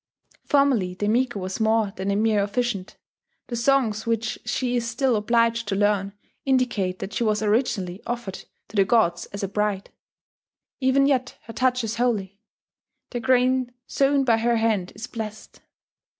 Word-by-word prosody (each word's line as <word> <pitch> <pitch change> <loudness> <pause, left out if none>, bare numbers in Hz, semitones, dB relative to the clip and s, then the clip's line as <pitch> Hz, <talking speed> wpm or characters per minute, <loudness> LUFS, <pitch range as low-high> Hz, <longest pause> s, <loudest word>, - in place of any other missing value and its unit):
Formerly 265 - +2
the 205 +2 -2
Miko 240 0 +1
was 185 +2 -4
more 220 -2 +2
than 190 +1 -3
a 200 - +1
mere 215 0 +2
officiant: 205 -2 -2 0.5
the 240 - -3
songs 235 -3 +1
which 230 -1 -1
she 245 +3 -1
is 235 -1 -1
still 255 0 +1
obliged 230 +1 +1
to 195 - -1
learn 200 -1 +1 0.3
indicate 245 -9 +1
that 195 - -6
she - - 0
was 215 -1 +1
originally 210 -4 0
offered 235 -5 -5 0.2
to - - -13
the 200 - +5
gods 180 -5 +2
as 200 0 -7
a - - 0
bride. 205 0 -2 0.9
Even 270 +1 +3
yet 265 -2 0
her 225 - -10
touch 255 0 +1
is 225 0 -3
holy; 205 -5 -1 0.7
the 245 - -2
grain 255 0 +2
sown 275 +1 +2
by 235 -3 +3
her 235 +1 +1
hand 220 -5 0
is 215 +3 -6
blessed. 220 -3 -8
225 Hz, 165 wpm, -24 LUFS, 205-245 Hz, 0.9 s, the